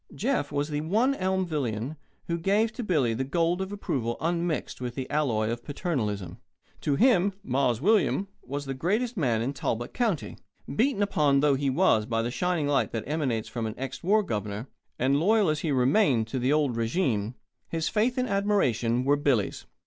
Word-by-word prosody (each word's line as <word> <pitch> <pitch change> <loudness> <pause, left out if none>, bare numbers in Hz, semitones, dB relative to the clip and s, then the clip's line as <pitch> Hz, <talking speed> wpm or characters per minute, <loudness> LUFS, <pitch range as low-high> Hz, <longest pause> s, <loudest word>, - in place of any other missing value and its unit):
Jeff 235 - -1
was 145 +1 -1
the 150 -1 -2
one 220 - +2
Elmvillian 155 - -1 0.3
who 170 0 -2
gave 210 +6 +2
to 245 - -5
Billy 150 - +1
the 125 +4 -1
gold 170 +6 0
of 190 +1 -4
approval 125 - -2
unmixed 170 -3 -2
with 125 -1 -4
the 130 -1 -4
alloy 115 -8 +1
of 120 0 -4
paternalism. 105 - -3 0.4
To 145 -3 +1
him 200 - +4
"Mars 125 -3 +1
William" 200 +1 +2
was 145 +2 -5
the 135 - -3
greatest 215 - -1
man 120 - +1
in 135 +4 -2
Talbot 120 -3 -3
County. 220 - -1 0.3
Beaten 230 - +1
upon 150 -9 +2
though 145 -1 +4
he 135 0 0
was 130 - +3
by 115 -1 0
the 120 - -2
shining 175 0 0
light 145 -1 +1
that 115 -2 -2
emanates 135 -7 -1
from 115 -2 -3
an 110 - -5
ex 135 0 -5
war 210 +4 +3
governor, 105 - -4 0.3
and 135 +3 +2
loyal 205 +2 +3
as 155 0 0
he 155 - -1
remained 130 - +3
to 130 - -2
the 125 +3 +1
old 145 -5 +2
régime, 115 - 0 0.3
his 165 -1 -1
faith 235 +4 +1
and 255 0 +1
admiration 130 - +1
were 145 +1 +4
Billy's. 140 -8 0
145 Hz, 185 wpm, -27 LUFS, 120-190 Hz, 0.4 s, him